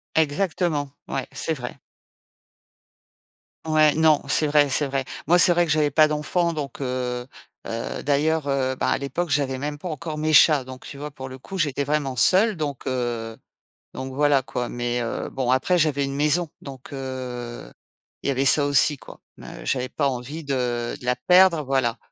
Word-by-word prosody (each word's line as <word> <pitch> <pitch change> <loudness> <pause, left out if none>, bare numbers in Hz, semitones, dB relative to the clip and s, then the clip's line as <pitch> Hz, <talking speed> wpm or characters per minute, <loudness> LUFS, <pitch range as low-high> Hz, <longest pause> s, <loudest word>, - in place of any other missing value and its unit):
Exactement, 160 -2 0 0.2
ouais, - - -3
c'est - - -2
vrai. - - -7 1.9
Ouais, 155 -1 +4
non, 155 -1 +4
c'est 155 - +3
vrai, 145 -1 +4
c'est 140 +2 +1
vrai. 135 0 -1 0.2
Moi, 175 +2 +5
c'est 175 - +6
vrai 175 0 +3
que 160 - -2
j'avais 150 -1 +2
pas 155 +2 +5
d'enfants 165 +3 0
donc 145 -3 -5
heu 125 -1 -3 0.4
heu, 115 0 -4
d'ailleurs, 150 +1 +1
heu, 130 -2 0
bah - - -1
à - - +2
l'époque, 140 +6 -3
j'avais 140 -3 0
même 145 +2 -4
pas 175 +5 -6
encore 155 0 -5
mes 155 +1 0
chats. 150 -2 +6
Donc 130 0 -11
tu 140 - -9
vois, 150 +1 -6
pour 130 -2 -8
le 130 - -9
coup, 195 +9 -8
j'étais 145 -5 0
vraiment 145 -2 -1
seule 195 - +4
donc 145 -5 -4
heu, 120 -3 -2 0.6
donc 130 0 -6
voilà 145 -1 +3
quoi. 125 -1 -4
Mais 120 0 -2
heu, 115 - -3
bon, 130 -2 -2
après 155 +8 +2
j'avais 145 -3 +1
une 135 - -4
maison 150 +4 +1
donc 135 -1 -10
heu, 125 - -6 0.5
il - - -5
y - - +2
avait 135 +1 0
ça 145 +2 +4
aussi 145 +1 +3
quoi. - - -14 0.2
M - - -12 0.2
heu, - - -11
j'avais 130 -1 -1
pas 145 - 0
envie 135 +5 -5
de 125 -4 -2
de - - -11
la 125 0 +2
perdre, 180 +3 +4
voilà 130 -3 0
140 Hz, 190 wpm, -23 LUFS, 130-155 Hz, 1.9 s, c'est